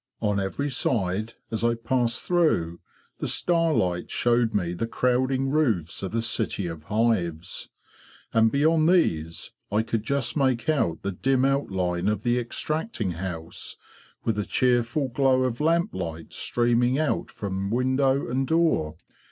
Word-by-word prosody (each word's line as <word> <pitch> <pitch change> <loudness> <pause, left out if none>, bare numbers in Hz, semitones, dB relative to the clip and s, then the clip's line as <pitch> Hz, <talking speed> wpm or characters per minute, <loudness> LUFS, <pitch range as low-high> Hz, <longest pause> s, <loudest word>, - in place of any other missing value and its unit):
On 105 -1 0
every 135 +9 -2
side, 110 -4 -1 0.2
as 110 0 -2
I 120 0 +3
passed 120 +1 0
through, 155 - +1 0.4
the - - -2
star 165 -2 +2
light 90 - 0
showed 120 -1 +2
me 90 -5 -1
the 115 +6 -2
crowding 130 +3 +1
roofs 115 - 0
of 95 - -4
the 115 0 -1
city 110 -3 -1
of 80 -2 -6
hives; 95 -7 -1 0.6
and 115 0 +4
beyond 155 +3 +3
these 85 - +1 0.2
I 105 +2 +2
could 115 -1 -1
just 130 +2 0
make 130 -5 +1
out 135 - 0
the 100 - -1
dim 130 +7 +1
outline 95 -10 0
of 105 0 0
the 120 0 +2
extracting 125 - -2
house, 85 -1 -6 0.5
with 110 -2 0
a - - +1
cheerful 125 +4 +1
glow 130 0 +2
of 125 +1 -2
lamplight 95 - -1
streaming 120 +2 +1
out 155 -1 0
from 100 -1 -4
window 130 +3 +1
and 130 +2 -1
door. 160 - +2
120 Hz, 145 wpm, -25 LUFS, 95-135 Hz, 0.6 s, and